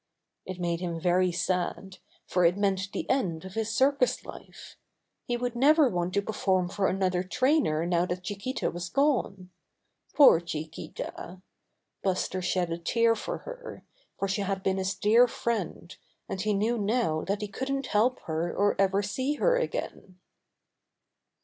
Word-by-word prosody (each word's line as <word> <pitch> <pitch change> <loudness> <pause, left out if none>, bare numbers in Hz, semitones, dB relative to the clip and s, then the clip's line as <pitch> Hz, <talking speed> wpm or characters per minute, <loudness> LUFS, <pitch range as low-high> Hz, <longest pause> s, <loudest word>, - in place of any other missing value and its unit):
It 185 -1 -6
made 170 -1 -1
him 170 -2 -3
very 180 +1 +2
sad, 185 +2 -2 0.3
for 180 - +1
it 175 +2 +4
meant 195 -1 0
the - - -4
end 185 -11 0
of 190 - -9
his 225 0 -2
circus 260 +3 +2
life. - - -11 0.5
He 240 - 0
would 245 0 -3
never 295 +4 +5
want 180 -1 -2
to 200 - +2
perform 190 -4 0
for 195 0 0
another 185 -1 0
trainer 250 - +1
now 175 0 +1
that 180 0 -4
Chiquita 205 +7 -3
was 175 +1 -5
gone. 235 -10 0 0.6
Poor 280 - +8
Chiquita! 165 +2 -7 0.6
Buster 185 -1 -1
shed 180 -1 0
a 165 - -3
tear 230 +6 +2
for 215 - -4
her, - - -9 0.3
for 195 - -1
she 195 +2 -1
had 195 -1 -2
been 190 0 +1
his 190 +1 -1
dear 230 +4 +5
friend, 210 -7 -3 0.3
and 190 - -4
he 210 0 +1
knew 225 +4 0
now 205 -7 0
that 200 +2 -2
he 210 - -3
couldn't 270 +6 -3
help 240 +3 +1
her 165 +2 -2
or 205 +1 +1
ever 195 +1 +2
see 260 +8 -1
her - - +3
again. 200 - -4
195 Hz, 160 wpm, -28 LUFS, 180-235 Hz, 0.6 s, Poor